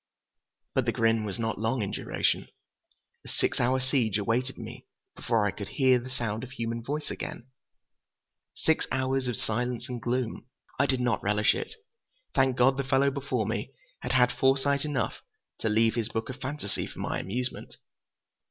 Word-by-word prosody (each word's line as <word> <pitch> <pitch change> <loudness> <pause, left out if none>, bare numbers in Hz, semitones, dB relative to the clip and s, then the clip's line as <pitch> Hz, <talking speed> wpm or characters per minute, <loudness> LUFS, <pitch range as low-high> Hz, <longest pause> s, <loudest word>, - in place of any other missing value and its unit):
But - - +2
the - - +2
grin 115 -1 +2
was 100 0 -3
not 115 -3 -1
long 110 +2 +1
in 100 - -2
duration. - - 0 0.8
A - - -12
six - - 0
hour 130 +2 +3
siege 130 -6 +1
awaited 120 +5 0
me - - -8 0.3
before 115 -3 +1
I 100 - +2
could 100 0 -6
hear 130 -2 +5
the 125 +2 -8
sound 115 -3 -2
of 130 +1 -8
human 115 -1 -2
voice 150 +4 -3
again—six 130 +4 -5
hours 130 0 +1
of 125 - -1
silence 120 +2 -2
and 125 -2 -4
gloom. 120 0 -1 0.3
I 140 - +4
did 130 -1 +1
not 125 -1 +1
relish 105 +1 +3
it. - - -4 0.6
Thank 130 -1 +3
God 130 +2 +5
the 140 - +1
fellow 135 +1 +3
before 130 -5 -1
me 115 +5 -3 0.3
had - - -2
had 125 -1 +5
foresight 135 +2 +2
enough 135 -6 -1 0.4
to 110 - 0
leave 110 +1 +4
his 115 -1 -1
book 110 -1 -3
of 130 +1 -7
fantasy 140 -6 -3
for - - -12
my - - -1
amusement! 125 +7 -3
125 Hz, 170 wpm, -29 LUFS, 115-130 Hz, 0.8 s, hear